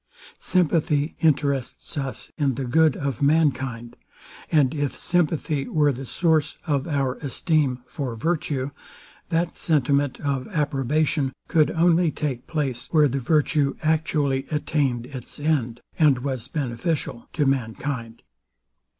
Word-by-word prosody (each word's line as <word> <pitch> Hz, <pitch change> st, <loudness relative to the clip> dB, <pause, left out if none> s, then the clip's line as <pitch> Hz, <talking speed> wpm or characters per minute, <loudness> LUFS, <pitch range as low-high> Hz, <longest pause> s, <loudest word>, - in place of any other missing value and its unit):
Sympathy 165 Hz, -4 st, +1 dB
interests 140 Hz, -5 st, 0 dB
us 135 Hz, -3 st, -4 dB
in 140 Hz, -4 st, +1 dB
the 135 Hz, -, -3 dB
good 155 Hz, +4 st, +3 dB
of 140 Hz, -4 st, -3 dB
mankind; 135 Hz, -6 st, +1 dB, 0.6 s
and 145 Hz, -5 st, +4 dB
if 145 Hz, -3 st, -2 dB
sympathy 155 Hz, -4 st, 0 dB
were 150 Hz, -2 st, +3 dB
the 135 Hz, 0 st, -6 dB
source 160 Hz, -1 st, +1 dB
of 145 Hz, -1 st, 0 dB
our 135 Hz, -4 st, 0 dB
esteem 140 Hz, -2 st, 0 dB
for 130 Hz, -5 st, -4 dB
virtue, 145 Hz, -1 st, -1 dB, 0.6 s
that 170 Hz, 0 st, 0 dB
sentiment 145 Hz, -5 st, +1 dB
of 140 Hz, -3 st, -2 dB
approbation 150 Hz, -, 0 dB
could 155 Hz, -3 st, +3 dB
only 170 Hz, 0 st, +4 dB
take 135 Hz, -5 st, -3 dB
place, 135 Hz, -7 st, -2 dB
where 150 Hz, -3 st, +5 dB
the 135 Hz, +1 st, -1 dB
virtue 145 Hz, +1 st, +2 dB
actually 150 Hz, -4 st, +1 dB
attained 145 Hz, -6 st, 0 dB
its 130 Hz, +1 st, -8 dB
end, 135 Hz, -6 st, 0 dB, 0.2 s
and 150 Hz, -5 st, +5 dB
was 130 Hz, -4 st, -3 dB
beneficial 135 Hz, -1 st, -3 dB
to 150 Hz, -, +1 dB
mankind. 120 Hz, -2 st, -2 dB
145 Hz, 125 wpm, -24 LUFS, 130-155 Hz, 0.6 s, where